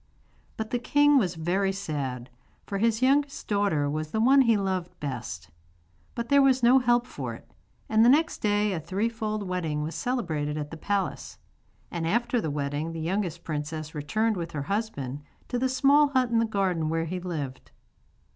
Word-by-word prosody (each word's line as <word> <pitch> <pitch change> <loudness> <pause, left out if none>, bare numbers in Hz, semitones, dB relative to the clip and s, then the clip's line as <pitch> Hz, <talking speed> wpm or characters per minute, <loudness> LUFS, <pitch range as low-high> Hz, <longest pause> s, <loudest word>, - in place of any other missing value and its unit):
But 220 0 -4
the 245 - 0
king 290 +3 +4
was 180 -6 -1
very 185 +4 0
sad, 135 -10 -4 0.3
for 200 - -3
his 225 +2 +1
youngest 280 +2 +2
daughter 200 -8 +1
was 155 +2 -3
the 220 - -2
one 270 +5 +6
he 230 -4 +4
loved 190 -3 -3
best. 120 - -5 0.6
But 235 0 -3
there 280 0 +6
was 260 -2 +3
no 250 +3 +7
help 240 -1 +2
for - - -6
it; - - -16 0.4
and 220 0 +4
the 235 - +7
next 320 +5 +3
day 205 -1 +1
a 175 - -2
threefold 215 +5 -2
wedding 160 -5 -2
was 160 +2 -4
celebrated 160 - -2
at 150 -1 -5
the - - -6
palace, 200 +4 -3 0.5
and 165 -2 -2
after 235 +5 +1
the 160 - -2
wedding 145 +2 -3
the 165 - -5
youngest 175 0 -2
princess 155 0 -4
returned 215 +9 0
with 170 -1 -5
her 145 -2 -3
husband 145 - -3 0.3
to 245 - -1
the 260 +1 +1
small 280 +3 +5
hut 260 -3 +1
in 230 - +3
the 230 - +3
garden 185 -7 0
where 165 0 0
he 180 +3 -4
lived. 150 -8 -5
195 Hz, 185 wpm, -27 LUFS, 155-235 Hz, 0.6 s, no